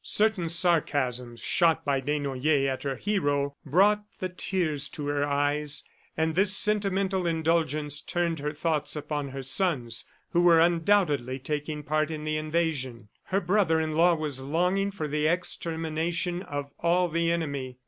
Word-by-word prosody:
Certain 210 -6 +1
sarcasms, 140 -8 +1
shot 165 +5 +2
by 140 -2 +1
Desnoyers 140 0 0
at 130 -1 -2
her 135 -1 -2
hero, 145 -9 -1
brought 200 +8 +3
the 185 - -3
tears 165 -5 0
to 150 - -6
her 145 0 0
eyes, 145 +1 0 0.3
and 160 0 +1
this 195 +2 +4
sentimental 195 -3 +1
indulgence 155 -3 0
turned 170 -2 -1
her 150 +1 -2
thoughts 155 -1 -1
upon 150 -1 -3
her 135 0 -6
sons 130 -5 -1 0.3
who 175 - +3
were 170 -2 +6
undoubtedly 165 -6 +2
taking 150 +2 -4
part 155 +1 0
in 155 -1 -5
the 155 0 -1
invasion. 155 -8 -2 0.2
Her 195 +2 0
brother 175 -3 +2
in 160 -1 -1
law 170 +2 +4
was 150 -4 -3
longing 180 +8 0
for 195 -6 -4
the 150 +1 0
extermination 170 0 -2
of 145 -5 -5
all 175 +2 +2
the 165 0 0
enemy. 140 -6 -3
155 Hz, 150 wpm, -27 LUFS, 145-175 Hz, 0.3 s, were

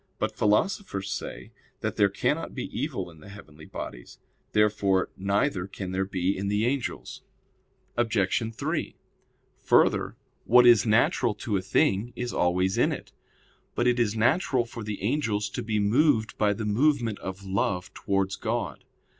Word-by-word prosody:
But - - -2
philosophers 105 - 0
say 100 - -6 0.3
that - - -2
there - - +4
cannot - - -1
be - - -3
evil - - -3
in 80 - -17
the 75 - -13
heavenly 80 -6 -13
bodies. - - -8 0.3
Therefore 105 -3 +2
neither 100 0 0
can 95 -1 -6
there 95 +1 0
be 95 0 -1
in 100 +1 -3
the 105 +2 +1
angels. 130 0 -3 0.7
Obj. 115 -4 +1
3: 110 - -3 0.7
Further, - - +3 0.3
what 125 +1 +6
is 120 -2 +6
natural 115 +1 +2
to 105 0 -3
a 95 - +1
thing 100 +4 +1
is 125 0 -4
always 90 +2 +1
in - - +3
it. - - -6 0.6
But 120 - +1
it 125 0 +3
is 115 -2 +1
natural 125 +1 +2
for 115 -1 -8
the 105 -2 -5
angels 110 -4 0
to 120 - -4
be 110 -2 -1
moved 110 +2 +2
by 105 -1 +2
the 110 +1 -4
movement 115 0 +1
of 95 +1 -7
love 95 -1 -1
towards 95 -1 -1
God. - - -3
105 Hz, 155 wpm, -27 LUFS, 95-120 Hz, 0.7 s, what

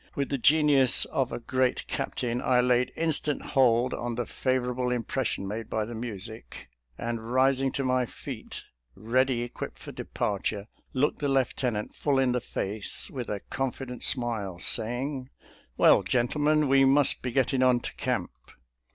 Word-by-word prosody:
With 140 -1 -1
the 140 - -1
genius 145 -2 +5
of 135 -2 -1
a - - -3
great 130 +1 0
captain, 120 0 -3
I 125 0 +3
laid 125 0 +2
instant 155 -3 0
hold 125 -2 +3
on 120 -1 -3
the 120 0 -2
favor 130 0 -1
able 125 0 -1
impression 120 -4 -2
made 110 +3 -5
by 110 -1 -1
the 120 - -7
music, 110 -1 -7 0.3
and 115 0 -4
rising 135 +1 +3
to 140 - -1
my 130 -1 +1
feet, - - -8 0.3
ready 125 +2 +1
equipped 120 - -7
for - - -9
departure, 100 0 -3 0.3
looked 140 +3 0
the 145 - -1
lieutenant 125 -5 0
full 140 -2 0
in 130 -1 +3
the 125 0 0
face 105 0 -3
with 125 -4 -5
a 100 -2 -3
confident 130 -1 -4
smile, 110 -8 0
saying, 130 +7 -1 0.2
" - - -31
Well, - - +6
gentlemen, 150 +5 +1
we 135 0 +5
must 135 +1 +4
be 125 - -3
getting 130 +1 +1
on 125 -1 +4
to - - -6
camp." - - -2
125 Hz, 160 wpm, -27 LUFS, 115-135 Hz, 0.3 s, Well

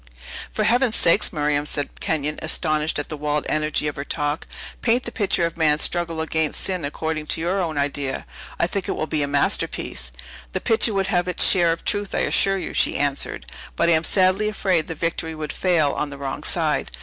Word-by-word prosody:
"For 215 - -1
Heaven's 235 +1 +2
sake, 170 +4 +3
Miriam," 150 -2 0
cried 145 -1 -3
Kenyon, 150 -1 -1
astonished 155 -1 0
at 145 - -3
the 155 - -4
wild 150 0 -1
energy 155 0 0
of 150 - -4
her 140 - -3
talk; 145 +1 -2 0.3
"paint 245 +2 +2
the 235 - -6
picture 195 -6 +1
of 170 0 -4
man's 150 -2 +3
struggle 170 -2 0
against 160 -1 -1
sin 185 -4 -1
according 155 +1 -3
to - - +1
your 180 +4 0
own 160 -4 -2
idea! 140 -1 -2 0.3
I - - +3
think 190 +2 -3
it - - +1
will - - -2
be 155 -1 -1
a 145 - 0
masterpiece." 140 - 0 0.4
"The - - 0
picture 225 -1 +2
would 195 0 +1
have 175 0 +2
its 180 - +4
share 175 -3 +5
of 165 - -4
truth, 205 -2 -1
I - - +1
assure 195 0 +3
you," 185 - -5
she - - +2
answered; 140 - -2 0.3
"but 170 - +2
I - - +5
am 160 -1 +3
sadly 190 +3 +3
afraid 185 -6 0
the 165 - -5
victory 165 0 -2
would 155 -1 -5
fail 165 -6 +2
on 150 - -2
the 140 - -8
wrong 135 -1 -4
side. - - -1
160 Hz, 210 wpm, -23 LUFS, 150-185 Hz, 0.4 s, share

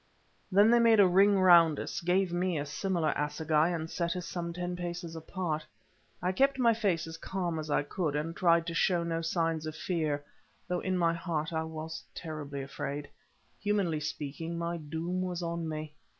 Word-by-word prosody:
Then 205 +4 +6
they 240 - +6
made 230 -2 +5
a 200 - +8
ring 195 +2 +5
round 170 -4 +6
us, - - -4
gave 180 +1 +1
me 175 -1 0
a 145 - -2
similar 170 +1 0
assegai, 150 +2 +1
and 165 -2 -2
set 170 +1 -2
us 180 -2 -4
some 170 -1 -4
ten 175 +1 -3
paces 175 -1 -5
apart. 160 -1 -3 0.6
I 180 - +2
kept 275 +7 +2
my 235 -3 +4
face 195 -7 0
as 165 0 -8
calm 175 -2 -3
as 155 0 -5
I 145 - +2
could, 150 0 -2
and 160 +3 -2
tried 170 -2 +3
to 170 - -4
show 175 0 +2
no 165 -1 -1
signs 165 -1 -1
of 155 - -5
fear, 155 -5 -1 0.4
though 180 0 -1
in 185 0 -1
my 170 -1 +3
heart 165 -2 -3
I 160 0 -1
was 160 0 -6
terribly 145 -4 -5
afraid. 140 +1 -5 0.5
Humanly 200 -6 0
speaking, 150 +2 -4
my 170 0 -2
doom 165 +4 -3
was 180 -1 -3
on 170 -1 -3
me. 155 -1 -5
170 Hz, 190 wpm, -30 LUFS, 155-180 Hz, 0.6 s, a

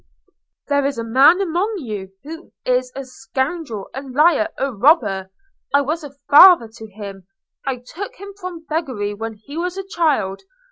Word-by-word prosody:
"There 285 -1 +2
is 275 -2 -1
a 230 - -2
man 270 +10 +5
among 385 +4 -1
you 210 - -6
who 325 +4 -10
is 250 0 +1
a 275 - -5
scoundrel, 255 - -4
a 270 - -5
liar, 300 +4 +3
a 275 -1 -1
robber. 200 - +3 0.5
I 285 - +5
was 310 +4 -2
a 285 -1 -10
father 330 -4 +8
to 220 - -9
him. 200 -3 -10 0.4
I 255 -2 -2
took 400 - -7
him 400 -3 -10
from 360 -3 -7
beggary 260 -11 -2
when 225 +1 -6
he 280 +9 -11
was 360 +2 -2
a 390 - -5
child. 300 - 0
275 Hz, 170 wpm, -20 LUFS, 225-330 Hz, 0.5 s, father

